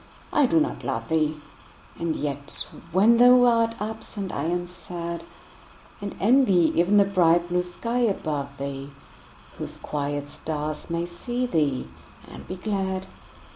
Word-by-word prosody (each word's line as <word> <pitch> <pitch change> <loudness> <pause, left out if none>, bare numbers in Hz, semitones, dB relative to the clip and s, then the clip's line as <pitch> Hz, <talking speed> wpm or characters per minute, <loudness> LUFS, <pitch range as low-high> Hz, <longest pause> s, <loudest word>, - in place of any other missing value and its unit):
I 290 -3 +5
do 325 - +4
not 305 - -1
love - - -3
thee! 155 -1 +1 0.6
And 170 -1 -1
yet 145 0 -3 0.3
when 210 +6 +5
thou 245 +1 +7
art 230 -1 +3
absent 210 -2 -5
I 140 - -2
am 175 +1 0
sad; 170 -1 -6 0.8
And 200 -1 -5
envy 200 -7 +4
even 180 +5 +3
the 200 - +6
bright 175 -3 +3
blue 180 0 +2
sky 230 +7 -3
above 150 - -1
thee, 140 0 -5 0.7
Whose - - -6
quiet 145 -1 -3
stars 150 0 -4
may 170 0 -1
see 240 +9 -3
thee 150 - 0 0.4
and - - -11
be 185 - -4
glad. 190 -1 -2
175 Hz, 140 wpm, -25 LUFS, 155-215 Hz, 0.8 s, thou